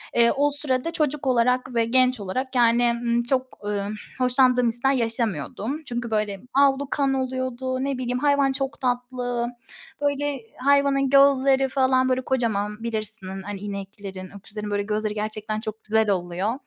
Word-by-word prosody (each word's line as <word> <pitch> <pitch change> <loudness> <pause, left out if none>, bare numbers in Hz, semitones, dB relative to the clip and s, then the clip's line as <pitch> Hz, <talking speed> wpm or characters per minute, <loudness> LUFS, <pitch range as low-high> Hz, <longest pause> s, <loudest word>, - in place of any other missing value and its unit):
Eee, 235 0 +5
o 290 +1 +2
sürede 285 +1 -2
çocuk 295 -3 0
olarak 250 0 +2
ve 230 -1 +3
genç 255 +1 +3
olarak, 255 +7 -4
yani, 240 0 +4
ımm, 235 0 +1
çok, 255 +1 -1
ımm, 205 0 -2 0.2
hoşlandığım 250 -1 +3
hisler 240 +4 +1
yaşamıyordum. 230 - -2
Çünkü, 240 -3 -4
böyle, 210 -2 -1 0.2
avlu 280 0 +3
kan 275 -2 +1
oluyordu, 260 0 -2
ne 275 -1 -1
bileyim, 250 0 -2
hayvan 280 -1 +3
çok 270 +1 -3
tatlı, 245 -1 -2 0.5
böyle, 285 -1 0 0.2
hayvanın 280 0 +3
gözleri 270 -1 +4
falan, 260 -1 +2
böyle, 255 0 +1
kocaman, 220 -5 -1
bilirsin, 215 -4 -5
hani, 200 0 -6
ineklerin, 195 -1 -7
öküzlerin, 210 +1 -7
böyle, 205 0 0
gözleri 210 0 -2
gerçekten 215 0 -3
çok 220 -1 -7
güzel 220 0 +2
oluyor. 185 +2 -1
245 Hz, 150 wpm, -24 LUFS, 215-265 Hz, 0.5 s, Eee